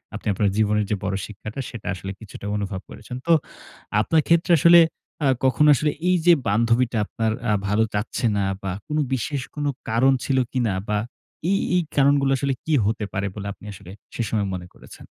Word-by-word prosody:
আপনি -, -, -7 dB
আপনার 100 Hz, +1 st, +1 dB
জীবনের 105 Hz, -1 st, +2 dB
যে 105 Hz, -, +1 dB
বড় 95 Hz, 0 st, -1 dB
শিক্ষাটা, 110 Hz, +4 st, -8 dB
সেটা 115 Hz, -4 st, -9 dB
আসলে 95 Hz, +1 st, -6 dB
কিছুটা 105 Hz, -2 st, -10 dB
অনুভব 100 Hz, -1 st, -4 dB
করেছেন। 115 Hz, +3 st, -9 dB
তো 170 Hz, -, +3 dB, 0.7 s
আপনার 160 Hz, +7 st, +2 dB
ক্ষেত্রে 170 Hz, +1 st, +3 dB
আসলে 170 Hz, +2 st, +8 dB, 0.5 s
আ -, -, +4 dB, 0.2 s
কখনো 150 Hz, +3 st, +4 dB
আসলে, 150 Hz, +3 st, +1 dB, 0.2 s
এই 180 Hz, -, +4 dB
যে 175 Hz, -, +8 dB
বান্ধবীটা 115 Hz, +3 st, +2 dB
আপনার 110 Hz, +1 st, -1 dB, 0.2 s
আ -, -, +3 dB, 0.2 s
ভালো 105 Hz, +2 st, +2 dB
চাচ্ছে 105 Hz, +4 st, -2 dB
না 100 Hz, -, +1 dB, 0.2 s
বা 95 Hz, -, -2 dB, 0.2 s
কোনো 150 Hz, 0 st, 0 dB
বিশেষ 130 Hz, +2 st, -2 dB
কোনো 145 Hz, -1 st, -1 dB, 0.2 s
কারণ 125 Hz, +5 st, +4 dB
ছিল 135 Hz, -1 st, 0 dB
কিনা 120 Hz, -6 st, 0 dB, 0.2 s
বা 105 Hz, -, +1 dB, 0.5 s
এই, 195 Hz, -, +3 dB, 0.2 s
এই 180 Hz, -, +4 dB
কারণগুলো 140 Hz, -1 st, +4 dB
আসলে 140 Hz, +1 st, 0 dB
কী 160 Hz, -, 0 dB
হতে 110 Hz, 0 st, -1 dB
পারে 95 Hz, +1 st, -1 dB
বলে 100 Hz, -1 st, -5 dB
আপনি 105 Hz, -, -16 dB
আসলে 90 Hz, -1 st, -12 dB, 0.2 s
সে -, -, -2 dB
সময় 105 Hz, -2 st, 0 dB
মনে 90 Hz, -1 st, -6 dB
করেছেন? -, -, -14 dB
115 Hz, 190 wpm, -23 LUFS, 105-140 Hz, 0.7 s, আসলে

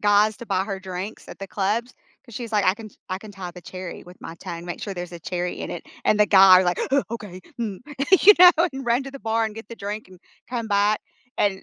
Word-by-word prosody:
guys 205 Hz, +1 st, +4 dB
to 235 Hz, -, -9 dB
buy 190 Hz, -2 st, +1 dB
her 195 Hz, -1 st, -5 dB
drinks 190 Hz, +2 st, -7 dB
at -, -, -10 dB
the 195 Hz, -, -6 dB
clubs 215 Hz, +6 st, -1 dB, 0.3 s
'cause 235 Hz, -, -14 dB
she's 235 Hz, -1 st, -6 dB
like, 205 Hz, -2 st, +2 dB
"I 185 Hz, -, +4 dB
can 215 Hz, +1 st, -10 dB
ch -, -, -24 dB, 0.2 s
I 185 Hz, -, -2 dB
can 210 Hz, +1 st, -11 dB
tie 190 Hz, -3 st, -7 dB
the 180 Hz, +1 st, -12 dB
cherry 185 Hz, 0 st, -8 dB
with 180 Hz, +1 st, -14 dB
my 165 Hz, -, -8 dB
tongue, 170 Hz, +1 st, -7 dB
make 175 Hz, -, -6 dB
sure 200 Hz, -, -5 dB
there's 175 Hz, -1 st, -6 dB
a 170 Hz, -, -7 dB
cherry 180 Hz, +1 st, -3 dB
in -, -, -5 dB
it," -, -, -6 dB, 0.2 s
and 210 Hz, -, +4 dB
the 210 Hz, -, +6 dB
guy 190 Hz, -2 st, +8 dB
w -, -, -2 dB
like, 180 Hz, 0 st, 0 dB
"Huh, 275 Hz, 0 st, +3 dB
okay, 205 Hz, -6 st, -7 dB, 0.2 s
mm," 210 Hz, -5 st, -3 dB, 0.4 s
you 415 Hz, -, +11 dB
know, 360 Hz, 0 st, +10 dB, 0.2 s
and 265 Hz, -1 st, -7 dB
run 240 Hz, +3 st, +2 dB
to 275 Hz, -, -8 dB
the 275 Hz, -, -9 dB
bar, 225 Hz, -2 st, 0 dB
and 220 Hz, -1 st, -4 dB
get 225 Hz, -, -9 dB
the 230 Hz, -, -9 dB
drink 210 Hz, +1 st, -5 dB
and 185 Hz, -1 st, -16 dB, 0.3 s
come 235 Hz, -3 st, -3 dB
back 205 Hz, +1 st, +2 dB, 0.4 s
and, 195 Hz, -1 st, +1 dB
205 Hz, 270 wpm, -23 LUFS, 185-225 Hz, 0.4 s, you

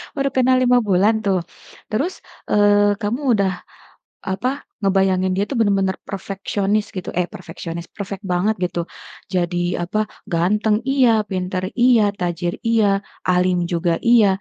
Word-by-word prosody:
baru 275 Hz, -1 st, 0 dB
kenal 260 Hz, 0 st, +4 dB
5 250 Hz, 0 st, +4 dB
bulan 200 Hz, +3 st, +4 dB
tuh, 190 Hz, -3 st, +2 dB, 0.5 s
terus, 285 Hz, -, -2 dB, 0.3 s
eee, 205 Hz, 0 st, +4 dB
kamu 215 Hz, +4 st, -1 dB
udah 200 Hz, -3 st, +2 dB, 0.7 s
apa, 250 Hz, +9 st, -2 dB, 0.2 s
ngebayangin 190 Hz, -1 st, +2 dB
dia 195 Hz, -, 0 dB
itu 275 Hz, -, -5 dB
bener-bener 195 Hz, -4 st, +1 dB
perfeksionis 195 Hz, +1 st, -2 dB
gitu 185 Hz, -, -5 dB
eh, 180 Hz, -, +1 dB
perfeksionis, 170 Hz, -1 st, -8 dB
perfect 200 Hz, -1 st, -7 dB
banget 190 Hz, +3 st, 0 dB
gitu. 175 Hz, -1 st, -1 dB, 0.5 s
Jadi 175 Hz, 0 st, 0 dB
apa 215 Hz, +5 st, -1 dB, 0.2 s
ganteng 210 Hz, +5 st, +2 dB
iya, 270 Hz, -3 st, +4 dB, 0.2 s
pinter 185 Hz, -1 st, -2 dB
iya, 245 Hz, -2 st, +4 dB, 0.2 s
tajir 175 Hz, -1 st, -2 dB
iya, 225 Hz, -2 st, +3 dB, 0.4 s
alim 180 Hz, -1 st, +2 dB
juga 170 Hz, -1 st, 0 dB
iya. 235 Hz, -3 st, +6 dB
195 Hz, 135 wpm, -20 LUFS, 180-215 Hz, 0.7 s, iya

